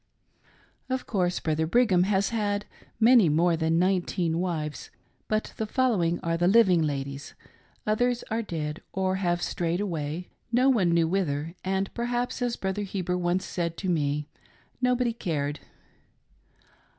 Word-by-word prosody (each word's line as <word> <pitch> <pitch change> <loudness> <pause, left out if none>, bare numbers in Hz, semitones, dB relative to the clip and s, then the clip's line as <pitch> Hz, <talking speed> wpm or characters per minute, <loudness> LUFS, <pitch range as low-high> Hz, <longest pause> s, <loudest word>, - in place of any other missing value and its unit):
Of 260 0 -2
course 180 -4 0
Brother 160 0 0
Brigham 190 -3 +4
has 195 0 +1
had 205 -2 -1 0.3
many 230 -5 +6
more 165 +3 +3
than 160 0 +1
nineteen 180 -2 +1
wives, 160 -4 -3 0.4
but 215 0 -1
the 220 - -2
following 210 -10 +1
are 165 0 0
the 175 +1 +2
living 190 -4 +5
ladies: 140 -2 -3 0.5
others 245 +3 +1
are 225 +1 +1
dead 155 -6 -4
or 190 0 0
have 175 -2 0
strayed 170 0 -1
away, 165 -3 -3 0.2
no 250 +3 +4
one 210 -9 +3
knew 170 -1 +3
whither, 165 -4 -1
and 190 +1 -1
perhaps, 245 +1 -2
as 245 -1 0
Brother 190 +1 -2
Heber 185 -3 -2
once 180 +1 0
said 170 -2 -3
to 190 - -3
me, 150 -3 0 0.5
nobody 250 -1 +2
cared. 150 -9 -2
180 Hz, 140 wpm, -27 LUFS, 165-215 Hz, 0.5 s, many